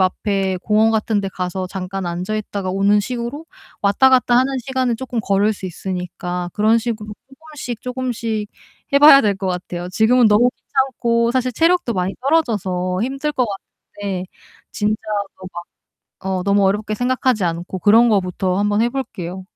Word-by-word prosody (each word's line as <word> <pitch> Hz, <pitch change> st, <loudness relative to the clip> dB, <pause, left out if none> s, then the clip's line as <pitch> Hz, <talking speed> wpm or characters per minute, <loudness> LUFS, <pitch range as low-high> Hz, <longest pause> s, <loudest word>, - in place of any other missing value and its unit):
앞에 190 Hz, 0 st, 0 dB
공원 220 Hz, +1 st, +3 dB
같은 220 Hz, -1 st, 0 dB
데 195 Hz, -, -3 dB
가서 185 Hz, 0 st, -3 dB
잠깐 185 Hz, 0 st, -5 dB
앉아 180 Hz, +5 st, -3 dB
있다가 200 Hz, -3 st, -4 dB
오는 200 Hz, +2 st, +3 dB
식으로 245 Hz, +7 st, -5 dB, 0.4 s
왔다 205 Hz, +7 st, +4 dB
갔다 250 Hz, -2 st, +4 dB
하는 265 Hz, +2 st, +2 dB
시간은 255 Hz, -1 st, -1 dB
쪼끔 245 Hz, -1 st, -3 dB
걸을 200 Hz, +2 st, +2 dB
수 195 Hz, -2 st, -7 dB
있으니까 180 Hz, 0 st, -5 dB
그런 220 Hz, +2 st, +3 dB
식으로 220 Hz, -2 st, -4 dB, 0.5 s
쪼금씩 240 Hz, -4 st, -5 dB
쪼금씩 235 Hz, -4 st, -3 dB, 0.4 s
해 280 Hz, -, +6 dB
봐야 285 Hz, -1 st, +9 dB
될 205 Hz, -3 st, +1 dB
것 190 Hz, 0 st, -4 dB
같아요. 180 Hz, -1 st, -4 dB
지금은 230 Hz, +5 st, +4 dB
너무 230 Hz, +4 st, +4 dB
귀찮고 235 Hz, -3 st, 0 dB
사실 255 Hz, 0 st, 0 dB
체력도 330 Hz, -2 st, +2 dB
많이 185 Hz, +1 st, -1 dB
떨어져서 195 Hz, -, 0 dB
힘들 275 Hz, +4 st, -2 dB
것 255 Hz, -4 st, +1 dB, 0.5 s
같은데 195 Hz, -3 st, -3 dB, 0.5 s
진짜 210 Hz, 0 st, 0 dB, 0.4 s
뭐 185 Hz, -, -10 dB
막 175 Hz, -, -6 dB, 0.6 s
어 190 Hz, -1 st, -2 dB
너무 200 Hz, 0 st, +3 dB
어렵게 210 Hz, +2 st, 0 dB
생각하지 245 Hz, -1 st, 0 dB
않고 175 Hz, +2 st, -3 dB
그런 225 Hz, +6 st, +5 dB
것부터 185 Hz, -3 st, 0 dB
한 205 Hz, +1 st, +1 dB
번 205 Hz, +1 st, +1 dB
해 235 Hz, -, +3 dB
볼게요. 190 Hz, -9 st, -5 dB
210 Hz, 335 characters per minute, -19 LUFS, 190-245 Hz, 0.6 s, 봐야